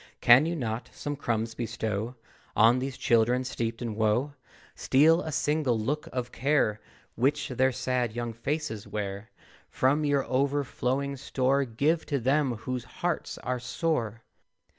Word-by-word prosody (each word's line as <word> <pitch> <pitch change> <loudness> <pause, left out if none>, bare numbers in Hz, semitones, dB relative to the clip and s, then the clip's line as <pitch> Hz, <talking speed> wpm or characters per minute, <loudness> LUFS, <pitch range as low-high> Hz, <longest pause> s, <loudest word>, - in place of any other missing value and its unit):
Can 125 +6 +7
you 170 - -1
not 115 -5 -3
some 145 0 -4
crumbs 115 -5 -2
bestow 110 0 -3 0.4
On 115 +3 +5
these 130 0 -4
Children 120 0 +3
steeped 115 -2 -3
in 115 -2 -3
woe; 110 +6 +1 0.4
Steal 160 +6 +4
a 160 - -4
single 150 -4 +1
look 140 +8 -2
of 125 -1 -3
care 130 -5 +1 0.3
Which 130 +5 0
their 130 +1 +2
sad 125 -2 -1
young 120 -1 -3
faces 135 -2 -3
wear; 100 +1 -4 0.4
From 140 +4 +2
your 145 -2 +1
overflowing 140 0 -1
store 135 +1 +1
Give 145 +8 +1
to 145 - 0
them 135 +1 +2
whose 125 +2 -4
hearts 165 +7 -3
are 125 0 -1
sore? 120 - -2
125 Hz, 140 wpm, -28 LUFS, 115-140 Hz, 0.4 s, Can